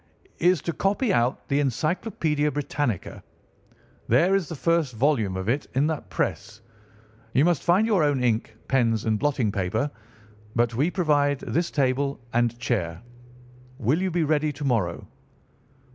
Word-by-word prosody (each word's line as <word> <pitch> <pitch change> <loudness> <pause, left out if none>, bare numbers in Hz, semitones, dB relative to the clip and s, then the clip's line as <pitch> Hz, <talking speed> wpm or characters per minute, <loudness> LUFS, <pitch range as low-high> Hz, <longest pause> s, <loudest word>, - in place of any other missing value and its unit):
"'Is 175 -1 +3
to 170 - -2
copy 200 +5 +1
out 120 -1 0
the 140 - +1
Encyclopædia 150 - 0
Britannica. 145 -6 -3 0.9
There 165 - +4
is 195 -6 +1
the 165 - -5
first 165 -4 0
volume 110 -7 +1
of 95 +1 -4
it 135 +5 0
in 135 +3 +3
that 150 -10 -3
press. 100 +5 -3 0.7
You 135 +4 +4
must 175 -4 +2
find 185 +5 +3
your 205 -7 +2
own 145 -4 +1
ink, 110 -2 0
pens, 115 -4 +1
and 110 -1 +1
blotting 135 -7 +1
paper, 100 +9 -1 0.6
but 120 -1 +2
we 140 +9 +1
provide 145 -6 +1
this 170 +1 -1
table 140 0 0
and 120 0 +1
chair. 90 -9 -2 0.8
Will 135 - +1
you 190 - 0
be 170 -1 0
ready 150 0 +1
to 145 +1 -8
morrow? 105 -10 -1
140 Hz, 150 wpm, -25 LUFS, 115-155 Hz, 0.9 s, There